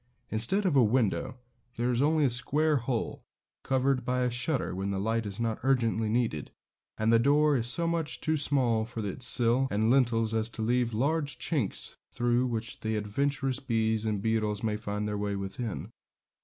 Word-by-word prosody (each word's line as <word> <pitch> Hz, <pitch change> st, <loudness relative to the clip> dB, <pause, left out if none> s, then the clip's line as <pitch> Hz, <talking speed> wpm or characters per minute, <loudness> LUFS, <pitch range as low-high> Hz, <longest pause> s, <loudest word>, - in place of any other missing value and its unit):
Instead 115 Hz, -, +2 dB
of 175 Hz, -6 st, +2 dB
a 130 Hz, -, +6 dB
window 120 Hz, +2 st, 0 dB, 0.4 s
there 120 Hz, +2 st, 0 dB
is 120 Hz, +1 st, 0 dB
only 155 Hz, +1 st, +3 dB
a -, -, +3 dB
square 150 Hz, +5 st, +3 dB
hole, 120 Hz, -2 st, -3 dB, 0.4 s
covered 130 Hz, -1 st, 0 dB
by 125 Hz, +1 st, -1 dB
a 125 Hz, -1 st, +1 dB
shutter 125 Hz, -, -1 dB
when 95 Hz, +2 st, -3 dB
the 100 Hz, -1 st, -2 dB
light 110 Hz, +2 st, -1 dB
is 100 Hz, +1 st, -6 dB
not 115 Hz, -1 st, -1 dB
urgently 115 Hz, -4 st, +1 dB
needed; 110 Hz, -, -1 dB, 0.5 s
and 110 Hz, +1 st, +2 dB
the 115 Hz, -, +6 dB
door 145 Hz, +4 st, +3 dB
is 120 Hz, -2 st, -1 dB
so 170 Hz, +7 st, 0 dB
much 165 Hz, -2 st, -2 dB
too 155 Hz, -, 0 dB
small 130 Hz, -6 st, +1 dB
for 115 Hz, -1 st, -6 dB
its 120 Hz, +6 st, 0 dB
sill 120 Hz, +3 st, +4 dB
and 110 Hz, +3 st, +1 dB
lintels 115 Hz, -4 st, +2 dB
as 110 Hz, 0 st, 0 dB
to 110 Hz, -, -5 dB
leave 120 Hz, +1 st, +1 dB
large 145 Hz, +4 st, 0 dB
chinks, 140 Hz, -, -2 dB
through 120 Hz, +1 st, +1 dB
which 115 Hz, -2 st, -5 dB
adventurous 130 Hz, +6 st, -1 dB
bees 110 Hz, -4 st, 0 dB
and 105 Hz, -2 st, -2 dB
beetles 110 Hz, -2 st, -1 dB
may 110 Hz, -1 st, 0 dB
find 105 Hz, -1 st, -4 dB
their 105 Hz, -1 st, -3 dB
way 100 Hz, -1 st, -2 dB
within. 100 Hz, +3 st, -5 dB
120 Hz, 185 wpm, -29 LUFS, 110-135 Hz, 0.5 s, a